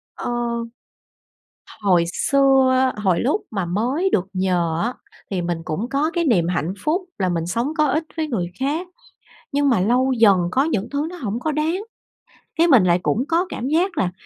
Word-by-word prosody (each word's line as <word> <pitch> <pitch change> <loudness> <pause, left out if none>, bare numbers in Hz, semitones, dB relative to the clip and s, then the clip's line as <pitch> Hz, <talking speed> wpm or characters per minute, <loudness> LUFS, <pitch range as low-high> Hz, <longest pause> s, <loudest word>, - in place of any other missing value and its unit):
Ờ. - - -5 1.5
Hồi 180 -4 +3
xưa, 265 +2 +3
hồi 190 -5 +1
lúc 295 - 0
mà 195 -4 -2
mới 245 - 0
được 185 -1 +1
nhờ 175 -3 0
á 240 +2 -1 0.4
thì 185 - -1
mình 175 -1 -2
cũng 180 +11 -3
có 290 +4 0
cái 345 -1 0
niềm 185 - +2
hạnh 175 0 -1
phúc 325 +5 +1 0.2
là 185 -1 +1
mình 165 -2 -1
sống 235 - -2
có 305 - +4
ích 310 +4 0
với 315 -1 -1
người 185 -10 -3
khác, 300 +7 -1 0.7
nhưng 285 0 +2
mà 235 -8 +3
lâu 250 +6 +2
dần 205 -4 +6
có 265 +8 +2
những 230 -9 -1
thứ 285 +2 -1
nó 360 - -8
hổng 235 - -4
có 310 +4 -1
đáng, 320 +6 -1 0.7
cái 335 +1 +3
mình 260 - +6
lại 175 0 +3
cũng 235 - +1
có 335 +2 +1
cảm 245 - -4
giác 340 +4 +1
là 180 -10 +1
250 Hz, 190 wpm, -21 LUFS, 185-300 Hz, 1.5 s, dần